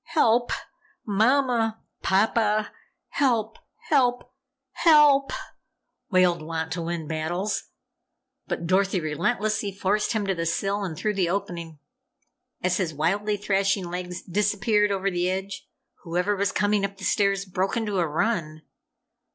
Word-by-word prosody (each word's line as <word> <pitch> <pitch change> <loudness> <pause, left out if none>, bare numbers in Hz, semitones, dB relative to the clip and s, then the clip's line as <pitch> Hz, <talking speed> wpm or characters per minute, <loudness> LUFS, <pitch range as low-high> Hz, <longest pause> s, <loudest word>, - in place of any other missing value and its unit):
Help! 240 -4 +3 0.5
Mama! 225 +1 +2 0.2
Papa! 215 +1 +2 0.4
Help! 230 -6 0 0.3
Help! 250 -5 +3 0.5
HELP!" 295 -4 +5 0.8
wailed 180 -3 +3
Wantowin 165 +1 -3
Battles. 175 +6 -2 0.8
But 170 - -3
Dorothy 190 +2 +2
relentlessly 205 +7 -1
forced 200 +4 0
him 215 -2 -1
to 195 - +1
the 165 -2 -2
sill 200 +4 -1
and 170 -5 -4
through 215 +4 -1
the 185 -4 0
opening. 170 -4 -4 0.9
As 180 0 +2
his 170 -6 -2
wildly 205 +7 0
thrashing 195 -2 0
legs 180 0 -5
disappeared 210 +2 +1
over 195 0 0
the 180 0 0
edge, 190 +1 -4 0.3
whoever 180 +3 0
was 200 0 0
coming 205 0 +1
up 200 0 -3
the 195 - -11
stairs, 200 -1 +1
broke 185 +3 -1
into 210 -4 -1
a 170 - +1
run. 155 -2 -1
195 Hz, 125 wpm, -25 LUFS, 175-215 Hz, 0.9 s, HELP